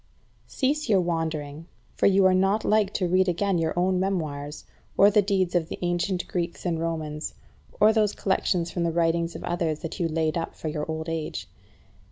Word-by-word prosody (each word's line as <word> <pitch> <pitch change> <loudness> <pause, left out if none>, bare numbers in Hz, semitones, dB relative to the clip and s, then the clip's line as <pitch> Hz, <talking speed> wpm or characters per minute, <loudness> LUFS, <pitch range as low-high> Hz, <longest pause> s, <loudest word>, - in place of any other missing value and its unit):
14. - - -16
Cease 285 +1 0
your 200 -3 +5
wandering, 160 -3 -3 0.3
for - - +2
you 195 -1 +4
are 185 - +5
not 195 +3 +2
like 210 -2 +3
to 185 - -1
read 185 +1 +3
again 185 +1 +1
your 160 +1 -1
own 180 +1 +2
memoirs, 155 -6 -3 0.3
or 200 +1 +7
the 210 0 +5
deeds 190 -3 0
of 170 -2 0
the - - -5
ancient 175 +1 -1
Greeks 170 0 -3
and 170 -2 0
Romans, 160 -2 -3 0.4
or 215 +1 +6
those 215 -2 +2
collections 180 -3 0
from 175 - -3
the 170 - +1
writings 165 0 0
of - - -7
others 170 -3 -1
that 165 - -6
you 170 - +1
laid 160 0 0
up - - -5
for 155 - -4
your 150 0 -4
old 160 0 -3
age. 160 - -4
175 Hz, 200 wpm, -26 LUFS, 160-190 Hz, 0.4 s, or